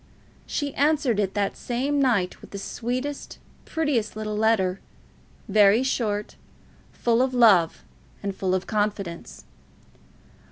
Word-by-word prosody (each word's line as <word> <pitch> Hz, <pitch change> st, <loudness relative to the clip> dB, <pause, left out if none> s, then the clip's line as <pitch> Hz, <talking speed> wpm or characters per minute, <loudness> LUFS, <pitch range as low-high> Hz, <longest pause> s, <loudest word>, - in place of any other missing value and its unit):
She 285 Hz, -2 st, -2 dB
answered 285 Hz, -7 st, +2 dB
it 195 Hz, -2 st, -1 dB
that 200 Hz, -1 st, 0 dB
same 275 Hz, +4 st, -1 dB
night 220 Hz, -9 st, +1 dB
with -, -, -13 dB
the 200 Hz, -, -7 dB
sweetest, 250 Hz, +7 st, -4 dB, 0.3 s
prettiest 285 Hz, -11 st, -1 dB
little 215 Hz, -1 st, -4 dB
letter, 210 Hz, -4 st, +2 dB, 0.7 s
very 210 Hz, +3 st, +5 dB
short, 210 Hz, -5 st, -1 dB, 0.6 s
full 235 Hz, 0 st, +1 dB
of 260 Hz, 0 st, 0 dB
love 200 Hz, -9 st, +4 dB, 0.4 s
and 200 Hz, -1 st, -3 dB
full 185 Hz, -1 st, 0 dB
of 185 Hz, 0 st, -2 dB
confidence. 205 Hz, -5 st, -3 dB
215 Hz, 120 wpm, -25 LUFS, 200-255 Hz, 0.7 s, very